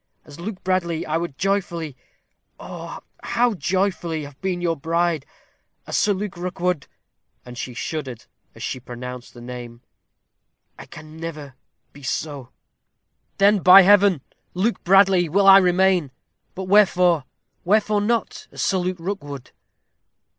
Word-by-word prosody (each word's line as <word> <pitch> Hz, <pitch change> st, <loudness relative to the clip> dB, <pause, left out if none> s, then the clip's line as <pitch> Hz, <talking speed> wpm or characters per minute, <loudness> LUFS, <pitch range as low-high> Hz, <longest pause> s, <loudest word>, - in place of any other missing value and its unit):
As 145 Hz, +1 st, -13 dB
Luke 190 Hz, +2 st, -7 dB
Bradley, 175 Hz, -3 st, -1 dB
I 155 Hz, +1 st, -1 dB
would 165 Hz, -5 st, -5 dB
joyfully 175 Hz, -7 st, -2 dB, 0.6 s
oh, -, -, -8 dB, 0.2 s
how 240 Hz, -1 st, +1 dB
joyfully! 180 Hz, -4 st, -1 dB
have 145 Hz, -1 st, -12 dB
been 190 Hz, -2 st, -2 dB
your 170 Hz, -1 st, 0 dB
bride. 165 Hz, -1 st, -1 dB, 0.6 s
As -, -, -4 dB
Sir 210 Hz, -, +2 dB
Luke 200 Hz, -1 st, -3 dB
Rookwood" 180 Hz, -3 st, -2 dB, 0.6 s
and 125 Hz, 0 st, -10 dB
she 125 Hz, 0 st, -6 dB
shuddered 135 Hz, -5 st, -5 dB, 0.3 s
as -, -, -9 dB
she 130 Hz, -, -4 dB
pronounced 125 Hz, 0 st, -9 dB
the 120 Hz, -, -11 dB
name 120 Hz, -1 st, -9 dB, 1.0 s
"I -, -, -11 dB, 0.2 s
never 155 Hz, -1 st, -8 dB
can -, -, -22 dB, 0.4 s
be 145 Hz, -, -14 dB
so." 140 Hz, -1 st, -4 dB, 0.9 s
"Then, 200 Hz, +1 st, +4 dB
by 185 Hz, +2 st, +9 dB
Heaven! 200 Hz, -4 st, +5 dB, 0.3 s
Luke 210 Hz, +6 st, -1 dB
Bradley 190 Hz, -2 st, +4 dB
will 195 Hz, +5 st, +2 dB
I 195 Hz, 0 st, +9 dB
remain. 180 Hz, -3 st, +2 dB, 0.5 s
But 190 Hz, -, -5 dB
wherefore 180 Hz, -6 st, +3 dB, 0.4 s
wherefore 210 Hz, +2 st, +2 dB
not 230 Hz, +2 st, -2 dB
as -, -, -4 dB
Sir 190 Hz, -, +1 dB
Luke 180 Hz, 0 st, -2 dB
Rookwood?" 145 Hz, -8 st, -6 dB
175 Hz, 135 wpm, -22 LUFS, 145-195 Hz, 1.0 s, by